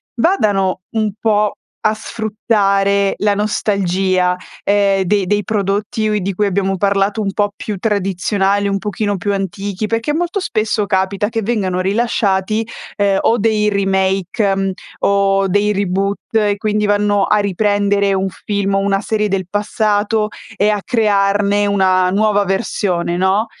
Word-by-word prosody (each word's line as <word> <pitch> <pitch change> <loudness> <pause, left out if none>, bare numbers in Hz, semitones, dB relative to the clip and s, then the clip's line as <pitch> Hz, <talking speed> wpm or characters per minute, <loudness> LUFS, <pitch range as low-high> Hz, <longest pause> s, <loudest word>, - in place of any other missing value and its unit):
vadano 205 - +1
un 220 -3 0
po' 210 -2 +2 0.3
a 215 - +1
sfruttare 200 -3 0
la 205 0 +2
nostalgia, 190 -3 0 0.3
ehm, 200 -1 +2
dei 200 +1 +1
dei 205 +2 0
prodotti 215 +2 -1
ui 210 -2 0
di 195 +1 -2
cui 210 +3 0
abbiamo 195 0 0
parlato 200 +2 +1
un 195 -1 -1
po' 205 0 0
più 210 -1 -5
tradizionali, 200 0 0
un 195 0 0
pochino 205 0 -2
più 200 +2 -2
antichi? 195 +1 -3
Perché 230 +6 -1
molto 350 +5 -1
spesso, 215 - -1
capita 190 +2 0
che 225 -1 -2
vengano 195 -5 -1
rilasciati, 205 +1 0 0.3
ehm, 200 -1 +2
o 235 - +2
dei 210 -1 +2
remake, 195 0 0
mhmm, 195 0 -1 0.3
o 195 -1 +2
dei 205 +2 +1
reboot, 195 0 -1 0.2
e 205 -2 +2
quindi 210 0 0
vanno 205 -1 +2
a 210 - +2
riprendere 200 0 +1
un 190 0 0 0.2
film 200 -1 -1
o 195 - +2
una 195 0 +1
serie 210 0 -1
del 190 -2 -1
passato, 210 +1 0 0.3
e 205 - +2
a 210 -1 0
crearne 205 -2 +2
una 185 -2 +2
nuova 205 +1 +2
versione, 190 -3 -1
no, 190 +4 +2
200 Hz, 145 wpm, -17 LUFS, 195-210 Hz, 0.3 s, po